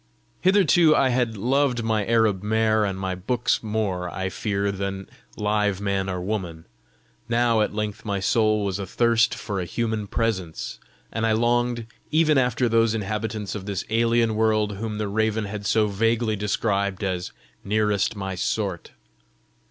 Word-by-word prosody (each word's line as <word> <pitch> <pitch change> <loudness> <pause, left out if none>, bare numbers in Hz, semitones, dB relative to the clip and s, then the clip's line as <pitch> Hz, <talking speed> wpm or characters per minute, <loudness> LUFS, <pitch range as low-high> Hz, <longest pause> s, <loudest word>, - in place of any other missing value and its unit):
Hitherto 180 -4 +5
I 135 - +3
had 120 -3 0
loved 125 +2 +1
my 110 -2 +1
Arab 110 -4 +2
mare 110 0 +2
and 95 -2 -2
my 95 -1 -2
books 120 +7 0
more, 105 -5 -2
I 95 +1 -3
fear, 100 0 -1
than 95 0 -4 0.3
live 105 -2 0
man 100 -1 -1
or 90 -1 -2
woman; 90 -4 -4 0.6
now 120 -1 +3
at 105 - -1
length 105 -1 -3
my 100 -2 -2
soul 110 +1 +2
was 100 0 -2
athirst 115 +4 +2
for 105 -3 -4
a 90 - -2
human 110 +2 -2
presence, 95 -8 -2 0.3
and 115 - -3
I 110 -1 +3
longed 120 +1 +1 0.2
even 155 -2 +4
after 125 -1 +1
those 115 -1 +3
inhabitants 105 -1 -3
of 100 -2 -6
this 100 -2 -3
alien 115 0 +2
world 110 -2 +1
whom 110 0 -4
the 105 -1 -2
raven 110 +1 0
had 100 0 -5
so 110 -1 +3
vaguely 110 +2 +1
described 100 -1 -1
as 90 -2 -2 0.3
nearest 105 +1 +1
my 95 -1 -4
sort. 95 -1 -2
105 Hz, 155 wpm, -24 LUFS, 100-115 Hz, 0.6 s, Hitherto